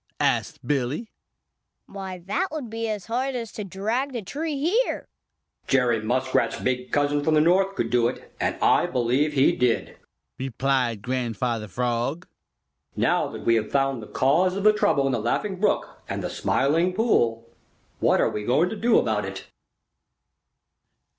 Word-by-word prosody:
asked - - 0
Billy. 145 - -1 0.7
"Why, 190 -2 -7
that 350 - 0
would 290 -8 -5
be 225 0 -3
as 210 -4 -4
hard 255 +4 -1
as 230 -3 -4
to 210 - -6
drag 220 +8 -2
the 235 -4 -4
tree 295 - -3
here." 370 - 0 0.6
"Jerry 125 -4 +2
Muskrat's 130 +4 0
big 125 0 -2
cousin 145 0 +1
from 155 +1 +2
the - - +5
North 190 +5 +3
could 115 - -2
do 120 -1 +3
it, 125 - -7
and - - 0
I - - +4
believe 130 +5 +1
he 135 -1 +4
did," 125 -2 0 0.4
replied 130 -4 0
Grandfather 120 -2 -2
Frog. 125 - -2 0.7
"Now - - +2
that - - -8
we 115 - +4
have 110 -2 0
found 135 -3 +1
the 105 - -9
cause 175 +8 +2
of 200 - -3
the 215 0 +6
trouble 205 -10 +2
in 135 - +1
the 120 - 0
Laughing 185 - -1
Brook 210 - 0
and - - -3
the - - -3
Smiling 165 +7 +1
Pool, 120 - +1 0.5
what - - +3
are - - +2
we 105 - -4
going 145 +11 +2
to 220 - -4
do 230 +2 +3
about - - +1
it?" - - -7
145 Hz, 165 wpm, -25 LUFS, -, 0.7 s, the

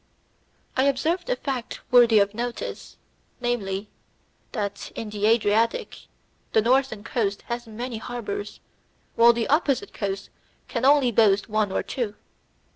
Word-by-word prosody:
I 260 - +3
observed 320 - 0
a - - +2
fact 260 - -4
worthy 240 -3 +7
of 200 0 +3
notice, 240 +2 -5 0.4
namely, 210 -5 -2 0.6
that, 205 -4 -4
in 220 -2 -5
the 210 0 0
Adriatic, 230 - +1 0.5
the 220 - +5
northern 250 -3 +2
coast 210 -3 -2
has 240 0 -5
many 235 +2 -5
harbours, 215 -4 -5 0.5
while 235 +1 +7
the 235 -1 -1
opposite 285 -3 +1
coast 195 -2 -4 0.4
can - - -2
only 275 -3 +5
boast 205 -3 +4
of - - -18
one 215 -2 +1
or - - -1
two. 225 -5 -3
230 Hz, 135 wpm, -25 LUFS, 210-250 Hz, 0.6 s, worthy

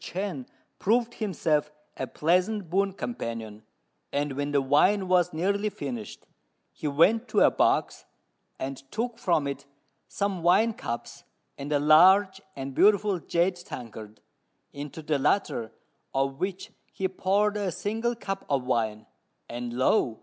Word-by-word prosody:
Chên 180 -8 -4 0.3
proved 235 +3 +1
himself 155 -8 0 0.3
a 130 - -4
pleasant 180 - 0
boon 195 +2 +2
companion, 115 - -5 0.5
and 145 0 -1
when 145 +1 -2
the 145 - +3
wine 185 +9 +3
was 180 -1 +3
nearly 200 +6 0
finished, 125 - -7 0.5
he 155 - -5
went 195 - +3
to 210 - +2
a - - +6
box, - - +1 0.5
and 135 0 -4
took 230 +2 -3
from 170 -6 +1
it 140 - -5 0.4
some 200 -3 -2
wine 200 +7 +4
cups 120 - -6 0.3
and 140 +2 -6
a 145 - +4
large 190 +6 +6 0.2
and 135 0 -5
beautiful 205 -2 +4
jade 175 +3 +1
tankard, 110 -10 -9 0.5
into 145 +2 -7
the 150 -2 0
latter 135 - 0 0.4
of 135 0 0
which 190 0 -4 0.2
he 190 - -1
poured 200 +3 +1
a 200 -3 -1
single 225 +6 -2
cup 195 -4 -5
of 140 -3 +1
wine, 110 -4 -1 0.4
and 120 0 -5
lo! 125 - +2
175 Hz, 140 wpm, -27 LUFS, 135-200 Hz, 0.5 s, a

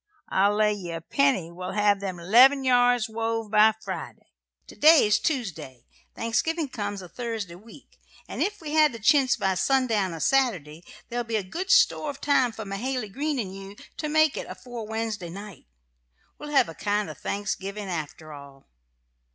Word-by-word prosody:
I'll 200 +2 +2
lay 210 0 +3
ye 190 -4 -7
a 165 - -4
penny 190 -2 0
we'll 180 +1 -6
have 205 -1 +2
them 190 -2 -5
'leven 250 +10 +5
yards 245 -2 +3
wove 225 -1 -3
by 215 0 +5
Friday. - - -7 0.3
To - - -14
day's 290 -10 +5
Tuesday, 175 - -4 0.3
Thanksgiving 290 +7 -1
comes 205 -5 -5
a - - -9
Thursday 225 -4 -5
week, 220 +9 -16 0.3
an' - - -6
ef 415 -1 -1
we 305 -2 -6
have 310 -3 +4
the - - -6
chintz 270 +3 +4
by 195 -5 0
sundown 210 -1 +1
a - - -8
Saturday 180 - 0 0.3
there'll 240 0 -2
be 225 -3 -2
good 355 - -6
store 305 - +4
of 280 -1 -7
time 275 -4 +2
for 220 -1 -8
Mahaly 220 +3 -3
Green 295 +3 -2
and 195 -6 -4
you 195 +1 -10 0.2
to 305 - -3
make 310 -1 +3
it - - -5
afore 240 -3 -8
Wednesday 220 -5 -4
night. 200 - -10 0.7
We'll 295 - -8
hev 280 -10 +3
a 165 - -8
kind 205 +2 -1
of 155 -3 -9
a - - -21
Thanksgiving, 200 0 -4
after 155 -2 -6
all. 140 -1 -13
215 Hz, 175 wpm, -25 LUFS, 190-260 Hz, 0.7 s, leven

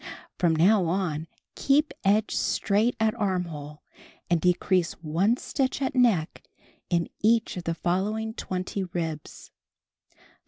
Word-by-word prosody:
From 170 -3 +3
now 185 +4 +4
on 165 -3 -1 0.3
keep 295 +2 +2
edge 210 +2 +2
straight 215 +4 +1
at 220 -1 +2
armhole 170 -9 -3 0.5
and 170 -2 +3
decrease 180 -1 +2
one 175 +9 0
stitch 265 -1 -2
at 265 -2 -1
neck 225 -11 +2 0.5
in 170 -2 +1
each 225 +1 +2
of 180 -2 -6
the 165 - -1
following 210 +6 -1
20 185 -1 -4
ribs. 165 -4 -6
185 Hz, 120 wpm, -26 LUFS, 170-220 Hz, 0.5 s, now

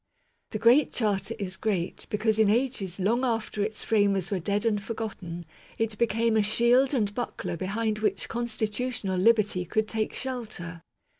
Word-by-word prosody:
The 215 - -3
Great 240 +6 +5
Charter 215 0 0
is 190 -3 -4
great 190 -6 -2
because 215 +1 +1
in 215 -2 +5
ages 215 -6 0
long 230 +7 +1
after 225 -4 -1
its 210 +1 -2
framers 200 -4 +2
were 195 - 0
dead 200 +5 -1
and 210 -3 +1
forgotten, 195 -6 -6 0.3
it 225 -1 -1
became 230 -1 +2
a 220 - +4
shield 240 +6 +4
and 205 -5 0
buckler 240 -6 -4
behind 210 +4 -2
which 210 -3 0
constitutional 225 -3 -2
liberty 210 -3 +3
could 215 +5 0
take 220 -1 -2
shelter. 215 -10 -5
215 Hz, 155 wpm, -27 LUFS, 200-230 Hz, 0.3 s, Great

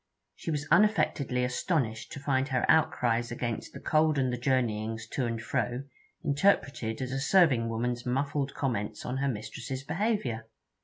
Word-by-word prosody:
She - - -6
was 145 -2 -2
unaffectedly 145 -12 +3
astonished 125 -3 -1
to 145 - -6
find 135 -1 +1
her 130 -2 +1
outcries 120 -7 +2
against 120 -1 -3
the - - -9
cold 155 -1 +2
and 130 -2 +1
the - - -1
journeyings 115 -4 0
to 130 -3 -1
and 115 -1 -2
fro 120 +1 -2 0.4
interpreted 140 - +1
as 130 - -4
a 135 - -1
serving 135 -7 +4
woman's 120 +2 -2
muffled 140 +2 -1
comments 110 -6 -2
on 125 +1 -2
her 140 +1 0
mistress's 115 +3 -5
behaviour. 160 - -1
130 Hz, 155 wpm, -29 LUFS, 115-145 Hz, 0.4 s, serving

